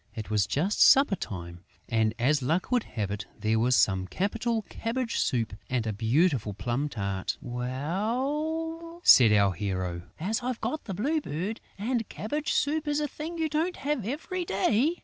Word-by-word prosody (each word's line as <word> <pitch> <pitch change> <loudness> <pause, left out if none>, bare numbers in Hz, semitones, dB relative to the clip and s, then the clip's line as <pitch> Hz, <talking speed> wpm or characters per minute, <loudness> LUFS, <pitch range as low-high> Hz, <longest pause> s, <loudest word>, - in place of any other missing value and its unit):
It 110 -2 -6
was 105 -2 +2
just 185 +9 0
supper 275 -7 +7
time 85 - -7 0.3
and, 110 -1 +1
as 140 +5 +2
luck 165 - 0
would 250 -1 +3
have 105 -4 -3
it, 105 -1 -4
there 110 +1 +1
was 125 +2 +3
some 95 -3 +2
capital 220 - -1
cabbage 230 +1 -2
soup 115 -5 0 0.2
and 125 -3 0
a 110 - -1
beautiful 115 - +1
plum 120 +8 -1
tart. 100 -5 -3
"Well," 265 - -3
said 115 -4 +8
our 100 -2 +4
hero, 95 -2 -3 0.2
"as 215 +9 -1
I've 250 -1 -3
got 310 - -3
the 195 - -4
Blue 300 - 0
Bird!... 180 - -4 0.2
And 230 +2 -1
cabbage 295 +8 -3
soup 305 +1 +1
is 295 0 +1
a 300 - 0
thing 320 +4 -6
you 320 -1 +1
don't 315 +4 0
have 285 -4 -1
every 315 - -3
day!..." 230 - +2
185 Hz, 170 wpm, -28 LUFS, -, 0.3 s, said